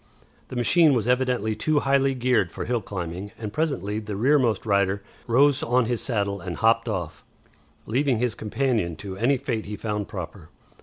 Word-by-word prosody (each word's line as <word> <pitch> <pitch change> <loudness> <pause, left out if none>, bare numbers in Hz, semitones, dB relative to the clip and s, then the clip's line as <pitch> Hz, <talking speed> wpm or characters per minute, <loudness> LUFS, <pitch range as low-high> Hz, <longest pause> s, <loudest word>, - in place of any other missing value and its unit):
The - - -8
machine 150 +5 +4
was 115 -2 0
evidently 125 -4 +1
too 145 +7 +1
highly 135 -1 +2
geared 125 -8 +1
for - - -5
hill 120 -1 0
climbing, 95 0 -5
and 110 -2 -6
presently 110 - -1
the 105 -2 -6
rearmost 120 -2 +2
rider 100 -1 +1 0.2
rose 140 +4 +4
on 125 +1 +2
his 120 0 -1
saddle 100 -5 -1
and 85 -1 -5
hopped 115 +3 +2
off, 85 -8 -4 0.6
leaving 130 +1 +1
his 120 -1 0
companion 110 -6 -1
to 95 +4 -7
any 120 +7 +2
fate 120 -5 -3
he 105 - -4
found 105 -2 -3
proper. 90 -2 -8
110 Hz, 170 wpm, -25 LUFS, 100-130 Hz, 0.6 s, machine